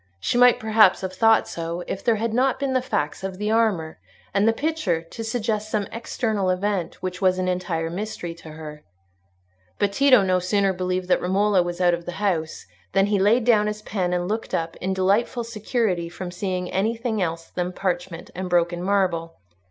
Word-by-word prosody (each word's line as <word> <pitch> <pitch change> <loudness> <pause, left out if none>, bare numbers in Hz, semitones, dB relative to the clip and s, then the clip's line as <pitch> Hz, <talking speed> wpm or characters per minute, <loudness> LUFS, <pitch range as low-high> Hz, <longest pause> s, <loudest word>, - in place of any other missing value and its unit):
She 95 - -1
might 245 0 +6
perhaps 220 -3 +4
have 190 -1 -4
thought 225 +3 +4
so, 170 +1 -4
if 195 - -5
there 230 -2 +3
had 225 +1 -2
not 255 +2 +2
been 275 -1 -1
the 255 - +2
facts 190 - -2
of 190 -1 -4
the 210 +2 -1
armour 210 -9 +1 0.3
and 200 +2 +3
the - - +6
picture 230 - -1
to 195 +7 -8
suggest 220 -2 -2
some 210 -2 -1
external 220 -4 -1
event 185 -2 -2
which 180 0 -4
was 185 -1 +3
an 185 0 -1
entire 175 -3 -2
mystery 180 -2 -5
to 165 -1 -13
her. 150 -1 -9 0.9
But 200 -1 +1
Tito 260 -3 +5
no 185 -1 +2
sooner 195 +2 +1
believed 185 0 -2
that - - +3
Romola 195 +1 +2
was 175 0 -4
out 175 -1 +4
of 170 0 -4
the 175 - -4
house 170 - -2 0.3
than 195 - +4
he 200 - +3
laid 215 +5 +4
down 215 -3 +4
his 210 0 -4
pen 185 -4 -2
and 175 0 -1
looked 220 +3 -2
up, 165 0 -2
in 190 +1 -2
delightful 205 +6 +1
security 215 -6 -1
from 175 +1 -7
seeing 180 -1 -3
anything 225 +2 -1
else 165 -1 -3
than 180 0 -2
parchment 180 -2 -3
and 185 +1 -5
broken 175 0 +1
marble. 180 -4 0
190 Hz, 195 wpm, -23 LUFS, 175-220 Hz, 0.9 s, might